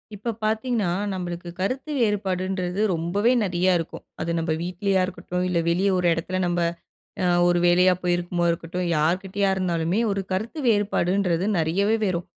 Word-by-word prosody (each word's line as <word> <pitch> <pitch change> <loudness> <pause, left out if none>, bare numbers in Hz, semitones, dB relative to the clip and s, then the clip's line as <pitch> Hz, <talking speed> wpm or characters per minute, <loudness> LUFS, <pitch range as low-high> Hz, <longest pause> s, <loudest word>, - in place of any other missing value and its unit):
இப்ப 225 +3 -3
பார்த்தீங்கன்னா, 220 -2 0 0.2
நம்பளுக்கு 175 -2 -5
கருத்து 255 +10 -2
வேறுபாடுன்றது 190 -3 -1
ரொம்பவே 175 +8 +1
நெறைய 180 -1 +2
இருக்கும். 165 - -6 0.2
அது 170 +2 -2
நம்ப 165 -1 0
வீட்லயா 185 +2 0
இருக்கட்டும், 180 -1 -4
இல்ல 175 -2 +1
வெளிய 185 +4 +2
ஒரு 180 -1 +1
இடத்துல 175 +3 -3
நம்ப 175 0 0 0.6
அ - - +1 0.2
ஒரு 175 0 +3
வேலையா 180 +1 +5
போயிருக்கும் 175 0 -1
போது 170 0 +3
இருக்கட்டும். 170 +2 -3
யார்கிட்டயா 185 +6 +1
இருந்தாலுமே 175 0 0
ஒரு 200 0 -1
கருத்து 215 +10 -3
வேறுபாடுன்றது 195 -4 +1
நெறையவே 190 +7 +2
வரும். 180 -2 -1
180 Hz, 145 wpm, -24 LUFS, 175-200 Hz, 0.6 s, வேலையா